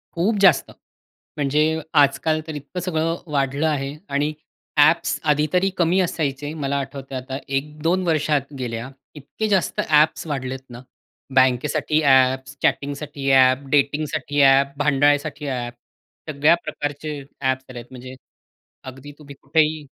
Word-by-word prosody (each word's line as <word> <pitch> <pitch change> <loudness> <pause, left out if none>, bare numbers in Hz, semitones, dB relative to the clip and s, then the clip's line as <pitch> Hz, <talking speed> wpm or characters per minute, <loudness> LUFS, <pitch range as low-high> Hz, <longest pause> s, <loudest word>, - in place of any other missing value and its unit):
खूप 200 +6 +1
जास्त. 190 - +4 0.7
म्हणजे 150 +3 +1 0.2
आजकाल 155 +3 +1
तर 155 - -6
इतकं 145 +5 -7
सगळं 165 -2 -1 0.2
वाढलं 140 +2 0
आहे 140 -2 -2
आणि 145 +2 0 0.4
ॲप्स 155 +3 +3
आधी 150 +1 +2
तरी 185 +2 +3
कमी 175 +2 +2
असायचे 150 -4 -2
मला 140 +1 -1
आठवतंय 135 -1 -6
आता. 130 +1 -5
1-2 150 +6 -1
वर्षात 150 -3 0
गेल्या 120 0 -4 0.3
इतके 150 +10 -5
जास्त 190 -7 0
ॲप्स 155 +1 +3
वाढलेत 135 -3 -4
ना. 120 0 -10 0.5
बँकेसाठी 130 +4 +2
ॲप्स, 130 0 +3
चॅटिंगसाठी 140 -1 -2
ॲप, 130 +1 +4
डेटिंगसाठी 145 0 0
ॲप, 140 0 +5
भांडायसाठी 145 +1 +1
ॲप. 120 -2 -3 0.6
सगळ्या 150 +3 +4
प्रकारचे 145 0 -5 0.2
ॲप्स 130 -1 -1
आलेत 120 -2 -8
म्हणजे 130 0 -10 0.7
अगदी 135 +2 -10
तुम्ही 140 -2 -12
कुठेही 155 +1 +1
145 Hz, 125 wpm, -22 LUFS, 135-155 Hz, 0.7 s, ॲप